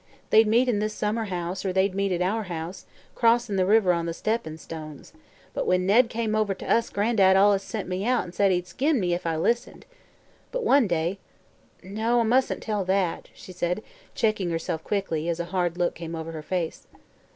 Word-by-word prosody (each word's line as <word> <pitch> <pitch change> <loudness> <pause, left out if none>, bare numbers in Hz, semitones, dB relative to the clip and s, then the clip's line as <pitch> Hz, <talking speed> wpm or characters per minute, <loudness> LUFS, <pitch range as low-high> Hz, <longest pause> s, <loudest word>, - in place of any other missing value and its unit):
They'd 220 0 +6
meet 235 +4 +3
in 225 -5 +1
this 215 0 -2
summer 220 +2 -1
house, 180 -1 -4
or 190 - -1
they'd 190 +1 +1
meet 195 0 0
at 180 0 0
our 215 +4 -1
house, 170 0 -6 0.3
crossin' 235 -2 +2
the 185 -1 +2
river 205 -3 +4
on 170 -1 -2
the 165 - -3
steppin' 215 -8 -2
stones; 155 -3 -9 0.4
but - - -2
when 180 0 +2
Ned 230 +5 +4
came 225 -1 -2
over 215 -2 +1
to - - -9
us 230 - +2
Gran'dad 200 -2 +3
allus 200 0 +5
sent 205 +1 -5
me 180 0 -2
away 195 - -3
an' 185 -8 -1
said 195 +2 +2
he'd 180 -1 0
skin 270 - 0
me 175 -3 0
if 175 -1 -3
I 165 - 0
listened. 235 +9 -1 0.7
But - - -2
one 280 - +4
day 170 +2 -1 0.6
No, 220 +5 0
I - - +3
mus'n't 250 +4 +1
tell 210 -3 -1
that," 190 -2 0
she - - -12
said, 180 +3 -2 0.3
checking 215 -5 0
herself 165 -1 -3
quickly, 170 -5 -2
as 170 0 -2
a 170 - -2
hard 175 -2 0
look 175 -1 +1
came 165 0 -7
over 160 0 -5
her 160 -1 -6
face. 170 0 -4
190 Hz, 205 wpm, -25 LUFS, 175-220 Hz, 0.7 s, They'd